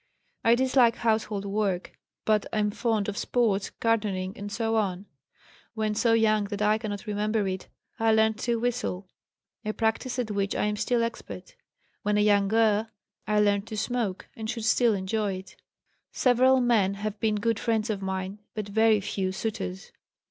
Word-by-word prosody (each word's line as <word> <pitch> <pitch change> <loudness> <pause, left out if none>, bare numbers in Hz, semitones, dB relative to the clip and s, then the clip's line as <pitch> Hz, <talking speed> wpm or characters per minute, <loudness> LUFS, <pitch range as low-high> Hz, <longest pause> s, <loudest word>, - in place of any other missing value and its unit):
I 230 +1 +5
dislike 255 -2 +4
household 220 -3 0
work, 195 -3 -1 0.3
but 215 -1 +2
am 210 -1 +1
fond 220 -2 0
of 205 - -3
sports, 210 -5 +1
gardening, 205 -5 -1
etc. 205 -2 -1 0.7
When 215 -1 0
so 225 +2 +2
young 215 -2 +3
that 205 0 -5
I 215 +1 +3
cannot 210 -1 -5
remember 210 0 0
it, 185 -1 -4 0.3
I 225 0 +3
learned 220 0 +3
to 235 -1 0
whistle, 230 -6 -2 0.6
a 215 0 -2
practice 225 +4 -1
at 240 -4 -2
which 200 -1 -1
I - - +1
am 210 0 0
still 230 +3 +1
expert. 235 - -6 0.5
When 210 0 +1
a - - +4
young 205 -1 +4
girl, 220 0 +2 0.4
I 210 0 +3
learned 205 0 +2
to 215 - -6
smoke, 220 -4 -2
and 220 -1 -5
should 230 -2 -3
still 225 0 +3
enjoy 200 +1 -1
it. 185 +1 -10 0.6
"Several 255 +1 +4
men 215 -6 +2
have 210 +1 -4
been 215 -1 +1
good 225 +1 0
friends 225 -1 0
of 200 -2 -3
mine, 190 +1 -4 0.2
but 215 -2 -3
very 220 0 +3
few 190 -1 -2
suitors. 95 - -4
215 Hz, 165 wpm, -27 LUFS, 200-225 Hz, 0.7 s, I